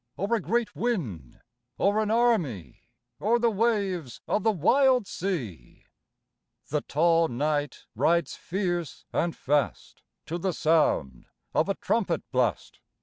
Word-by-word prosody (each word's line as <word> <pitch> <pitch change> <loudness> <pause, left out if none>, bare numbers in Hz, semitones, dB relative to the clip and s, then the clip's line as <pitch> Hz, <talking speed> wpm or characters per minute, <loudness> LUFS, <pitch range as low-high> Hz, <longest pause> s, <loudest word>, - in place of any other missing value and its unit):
Or 200 +5 -1
a 230 - +2
great 220 +5 -1
wind, 125 - -3 0.4
or 205 +2 +2
an 215 -1 0
army, 215 - 0 0.3
Or 225 +4 +2
the 235 -1 +2
waves 200 - -1
of 215 - +1
the 220 - +3
wild 250 - +3
sea? 130 - -5 0.8
The 150 0 0
tall 165 +3 +2
knight 145 +3 -2
rides 170 -3 +1
fierce 175 -5 -3
and 170 0 0
fast 145 +1 -1 0.2
To 170 +3 -4
the 185 +1 -1
sound 150 - +1 0.3
of 160 - +2
a 195 - +1
trumpet 185 -8 -1
blast. 125 - -1
175 Hz, 130 wpm, -27 LUFS, 145-215 Hz, 0.8 s, the